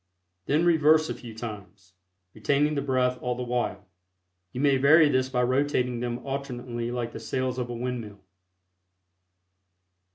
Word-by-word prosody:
Then 155 +5 +2
reverse 155 -1 +4
a - - -1
few 115 -3 -10
times, 100 -4 -9 0.4
retaining 140 +7 +1
the 140 - -1
breath 130 -2 0
all 125 0 -1
the 125 - -4
while. 125 0 -2 0.7
You 125 - -6
may 140 -1 +3
vary 150 +3 +6
this 130 -1 +1
by 125 -1 +1
rotating 125 -1 +1
them 120 0 -4
alternately 125 -3 -4
like 120 -1 -3
the - - -7
sails 130 +3 -2
of 120 -1 -3
a - - -4
windmill. 115 -4 -5
125 Hz, 150 wpm, -26 LUFS, 120-140 Hz, 0.7 s, vary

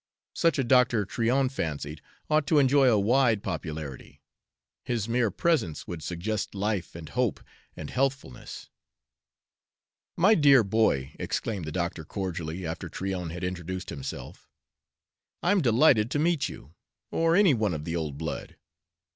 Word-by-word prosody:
Such 165 -2 +2
a 135 - +2
doctor, 120 -4 +3
Tryon 125 +6 +1
fancied, 75 - -4 0.3
ought 155 -1 +2
to 155 - +3
enjoy 135 -1 +5
a 110 - +4
wide 115 0 +3
popularity. 80 -6 -6 0.6
His 115 -3 -2
mere 115 -1 +1
presence 155 - 0
would 85 -3 -6
suggest 100 +7 -3
life 100 -3 -2
and 85 -2 -8
hope - - 0 0.4
and 80 - -6
healthfulness. 135 - -3 1.5
"My 190 +6 +5
dear 140 - +6
boy," 95 -11 +1
exclaimed 100 -7 -3
the 80 - -5
doctor 85 0 -3
cordially, 90 -1 -4
after 80 0 -5
Tryon 95 -3 -4
had 85 +2 -7
introduced 90 0 -4
himself, 70 -2 -8 0.9
"I'm 195 +1 +3
delighted 115 -3 +4
to 145 - -1
meet 160 -1 +1
you 75 - -12 0.4
or 165 0 +2
any 195 -5 +5
one 105 -7 0
of 75 0 -6
the 85 - -3
old 75 -4 -3
blood. 80 -1 -5
105 Hz, 140 wpm, -27 LUFS, 85-135 Hz, 1.5 s, dear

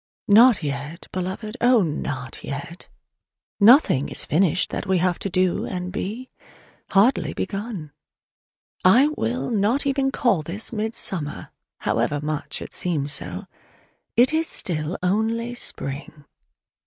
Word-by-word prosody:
Not 225 -1 +6
yet, 145 +4 -5
Beloved, 190 +5 -4
oh, 240 -3 +5
not 145 -4 -4
yet! 170 +6 -7 0.7
Nothing 210 - +5
is - - 0
finished 180 +1 +1
that - - -4
we 190 -1 +2
have 180 0 +1
to 195 - -2
do 185 0 +1
and 180 -1 -4
be: 220 +7 -5 0.6
hardly 215 +6 +3
begun! 195 -7 -4 0.9
I 245 +11 +6
will 250 -4 -2
not 220 +5 +1 0.3
call 235 -9 +2
even - - -6
this 220 +3 -2
"midsummer," 205 -8 -3 0.3
however 145 - 0
much 150 0 -4
it - - -10
seems 150 -5 -1
so: 90 -5 -3 0.7
it 250 +5 +5
is 320 +1 +1
still 155 -1 -2
only 225 +5 0
spring. 145 - -4
185 Hz, 125 wpm, -23 LUFS, 155-230 Hz, 0.9 s, Not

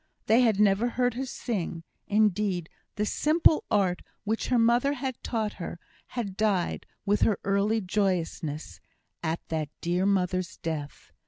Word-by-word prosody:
They 225 +4 +5
had 220 -5 +3
never 210 +3 +4
heard 245 0 +1
her 260 +3 -3
sing; 180 -10 -3 0.2
indeed, 205 -4 +1 0.3
the 210 - 0
simple 310 +6 +3
art 190 -5 +2 0.2
which 220 +2 -1
her 250 - +2
mother 240 +4 +4
had 260 -2 -4
taught 220 -3 -2
her, 170 - -5 0.3
had 215 -6 -4
died, 200 -4 0 0.2
with 205 +1 +2
her 215 - +3
early 200 +3 +2
joyousness, 180 -6 -2 0.4
at 165 0 -3
that 155 -2 -2
dear 180 +3 +1
mother's 185 -2 0
death. 155 -3 -5
205 Hz, 145 wpm, -28 LUFS, 180-230 Hz, 0.4 s, They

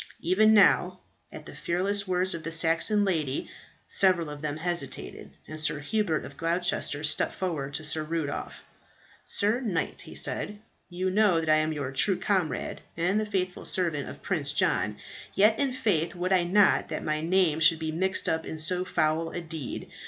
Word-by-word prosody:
Even 195 +6 +4
now, 185 -2 +4 0.3
at 155 - -10
the - - -10
fearless 200 +3 -1
words 185 +1 +1
of 165 - -5
the 165 +1 -5
Saxon 165 +6 +4
lady 155 -8 -1 0.4
several 170 -5 +2
of 145 -1 -9
them 150 -1 -3
hesitated, 175 +1 -4 0.2
and 155 0 -7
Sir 155 - +1
Hubert 160 +2 -1
of 140 - -12
Gloucester 165 -3 0
stepped 155 - 0
forward 145 -7 -3
to 160 - -3
Sir 155 +1 -1
Rudolph. 155 -2 -4 0.6
"Sir 210 +4 +1
knight," 200 -10 -2
he - - -10
said, 210 - +1 0.3
"you 185 +1 -2
know 200 -4 +3
that 160 -1 -3
I 155 - +5
am 155 0 0
your 140 -4 -4
true 180 +8 +3
comrade 185 -8 -2 0.2
and 180 +5 +1
the 215 - -2
faithful 185 -3 -2
servant 165 -6 -1
of - - -11
Prince 150 -7 -1
John. 150 - 0 0.4
Yet 215 +3 +4
in 280 -2 +1
faith 195 -11 0
would 180 +2 -1
I 180 -2 +3
not 200 +3 +3
that - - -4
my 155 0 -1
name 170 -2 +2
should 160 +1 +5
be 160 0 -3
mixed 190 +4 0
up 160 0 0
in 160 - -5
so 180 +4 0
foul 160 -2 0
a - - -5
deed. 160 -5 -6
170 Hz, 180 wpm, -27 LUFS, 155-190 Hz, 0.6 s, I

